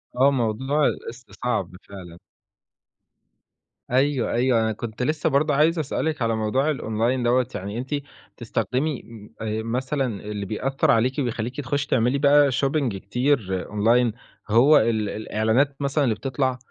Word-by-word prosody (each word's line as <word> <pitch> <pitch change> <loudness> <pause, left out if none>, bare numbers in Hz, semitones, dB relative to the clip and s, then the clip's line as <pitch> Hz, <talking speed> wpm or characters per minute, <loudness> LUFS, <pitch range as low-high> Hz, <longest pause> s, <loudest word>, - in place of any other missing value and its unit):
آه، 135 +3 +4
موضوع 130 +4 0
القِسط 120 +2 -6
صعب 95 -7 -1
فعلًا. 90 -4 -10 1.7
أيوه، 135 0 +1
أيوه، 120 -1 +2
أنا 110 0 0
كنت 115 +2 -5
لسه 155 +2 0
برضه 145 +2 +2
عايز 160 +4 +3
اسألِك 155 0 -2
على 115 -1 +1
موضوع 130 +8 +1
الأونلاين 120 0 -1
َدّوة، 125 +1 +2
يعني 100 +4 -5
أنتِ 130 +2 -5 0.5
بتستخدمي 125 +5 -2
م 110 -3 -13
آآ، 110 0 -2
مثلًا 130 +4 -1 0.2
اللي 105 -1 -5
بيأثّر 135 +7 0
عليكِ 125 +5 +1
وبيخلّيكِ 120 +1 -3
تخشّي 140 +1 -2
تعملي 125 +2 +2
بقى 145 0 +5
شوبينج 135 -3 0
كتير 100 -2 -1
أونلاين 115 +2 +2 0.4
هو 130 +8 +6
ال 110 -2 +1
الإعلانات 110 +6 0
مثلًا 140 +2 +1
اللي 115 -5 +1
بتطلع، 130 +1 -1
125 Hz, 140 wpm, -23 LUFS, 110-140 Hz, 1.7 s, هو